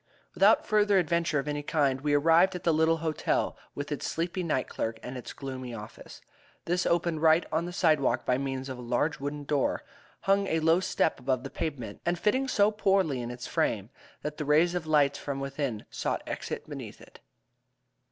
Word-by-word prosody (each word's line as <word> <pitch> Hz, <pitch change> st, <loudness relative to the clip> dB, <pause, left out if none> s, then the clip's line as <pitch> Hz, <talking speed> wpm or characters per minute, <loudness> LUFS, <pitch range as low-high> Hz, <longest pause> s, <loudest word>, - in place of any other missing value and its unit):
Without -, -, +5 dB
further 210 Hz, -2 st, +3 dB
adventure 170 Hz, -3 st, +1 dB
of 140 Hz, +1 st, -2 dB
any 145 Hz, 0 st, -2 dB
kind 140 Hz, -3 st, +1 dB
we 145 Hz, 0 st, +2 dB
arrived 165 Hz, +5 st, +4 dB
at 180 Hz, -, -6 dB
the 165 Hz, -, +3 dB
little 160 Hz, +1 st, +3 dB
hotel, 155 Hz, -1 st, 0 dB, 0.2 s
with 145 Hz, +1 st, -5 dB
its 145 Hz, -, -2 dB
sleepy 170 Hz, +3 st, -2 dB
night 155 Hz, -7 st, -1 dB
clerk 110 Hz, 0 st, -3 dB
and 125 Hz, -, -6 dB
its 125 Hz, -, -7 dB
gloomy 130 Hz, -3 st, -6 dB
office. 105 Hz, -1 st, -10 dB, 0.4 s
This 180 Hz, +1 st, 0 dB
opened 170 Hz, -2 st, +1 dB
right 160 Hz, +1 st, +5 dB
on 160 Hz, +2 st, 0 dB
the 175 Hz, -, -5 dB
sidewalk 155 Hz, -6 st, +2 dB
by 125 Hz, 0 st, +2 dB
means 135 Hz, -1 st, -3 dB
of 130 Hz, -2 st, -6 dB
a -, -, -6 dB
large 125 Hz, +6 st, 0 dB
wooden 145 Hz, +1 st, -4 dB
door, 145 Hz, -1 st, 0 dB, 0.4 s
hung 195 Hz, 0 st, +2 dB
a 160 Hz, -, +1 dB
low 165 Hz, +2 st, +4 dB
step 170 Hz, -5 st, 0 dB
above 130 Hz, 0 st, -1 dB
the 135 Hz, -, -7 dB
pavement, 130 Hz, -10 st, -5 dB
and 175 Hz, +1 st, 0 dB
fitting 260 Hz, +9 st, +1 dB
so 210 Hz, -4 st, +3 dB
poorly 195 Hz, -, +1 dB
in 120 Hz, -, -5 dB
its 125 Hz, 0 st, -7 dB
frame 105 Hz, +2 st, -1 dB, 0.3 s
that 150 Hz, 0 st, -4 dB
the 150 Hz, -, -2 dB
rays 160 Hz, +4 st, +4 dB
of 175 Hz, -3 st, -2 dB
the -, -, -8 dB
light 145 Hz, -2 st, +3 dB
from 140 Hz, -1 st, -4 dB
within 135 Hz, -5 st, -3 dB
sought -, -, -2 dB
exit -, -, -5 dB
beneath -, -, -8 dB
it. -, -, -16 dB
150 Hz, 200 wpm, -28 LUFS, 135-170 Hz, 0.4 s, Without